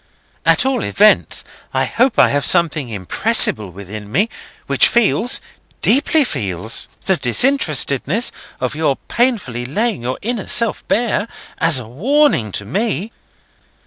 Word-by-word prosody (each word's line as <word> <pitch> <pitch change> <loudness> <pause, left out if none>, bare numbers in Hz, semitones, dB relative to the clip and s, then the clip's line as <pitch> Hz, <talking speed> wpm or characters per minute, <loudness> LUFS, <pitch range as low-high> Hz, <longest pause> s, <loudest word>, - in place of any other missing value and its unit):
At - - +4
all 265 -4 0
events, 210 +1 +2 0.3
I - - +2
hope 250 +1 0
I - - +5
have 145 0 0
something 160 -7 +1
impressible 105 0 +1
within 100 +3 -10
me, 200 - +1 0.4
which - - +5
feels—deeply 245 +5 +1
feels—the 110 - -2
disinterestedness 155 - +2 0.3
of 130 +1 -2
your 155 -3 0
painfully 220 - -1
laying 205 - -2
your 125 +2 -3
inner 230 -2 -3
self 230 -2 +1
bare, 230 -1 0 0.3
as 165 -3 +3
a 125 -4 -7
warning 210 - +1
to 105 - -4
me." 205 - -2
165 Hz, 120 wpm, -17 LUFS, -, 0.4 s, I